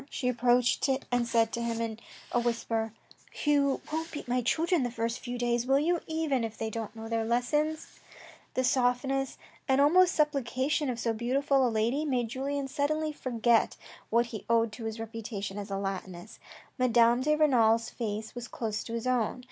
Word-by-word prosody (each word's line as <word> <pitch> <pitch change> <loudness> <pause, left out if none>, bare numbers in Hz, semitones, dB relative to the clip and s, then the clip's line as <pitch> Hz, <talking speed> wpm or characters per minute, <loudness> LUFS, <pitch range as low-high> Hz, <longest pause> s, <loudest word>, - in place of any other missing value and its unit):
She 250 - -3
approached 245 +2 +2 0.2
and 245 -1 +1
said 230 -1 +2
to 235 - -3
him 230 -1 -2
in 225 -1 -3 0.3
a 240 - +2
whisper: 230 -2 -1 0.2
" - - -12
You 285 -2 +3
won't 320 +1 -2
beat 295 - -7
my 250 +1 +1
children 330 +7 +1
the 245 - 0
first 230 0 -2
few 245 -1 -5
days, 240 0 0
will 270 +1 +4
you, 335 +4 +1
even 315 -6 0
if 225 -1 -4
they 220 0 -3
do 230 - -3
not 220 0 -6
know 225 0 -7
their 225 0 0
lessons? 295 +7 0 0.4
" - - -21
The 255 - +1
softness 265 +1 +1 0.3
and 265 -1 +3
almost 355 +6 +5
supplication 285 -1 +1
of 240 -2 -3
so 230 -1 0
beautiful 265 +3 +2
a - - +1
lady 230 +6 0
made 250 -6 0
Julien 275 +2 -2
suddenly 305 +2 -1
forget 235 -4 +1 0.3
what 235 +2 +3
he 225 -3 -7
owed 230 -1 +3
to 225 +1 -8
his 220 0 -4
reputation 215 -3 -5
as 205 0 -6
a 195 - -2
Latinist. 190 -1 -5 0.4
Madame 240 -1 +4
de 300 +3 +2
Renal's 230 -7 +3
face 220 -2 -4
was 245 -1 -6
close 215 -2 -3
to 230 - -6
his 230 0 -3
own. 250 -1 0
245 Hz, 190 wpm, -29 LUFS, 225-275 Hz, 0.4 s, almost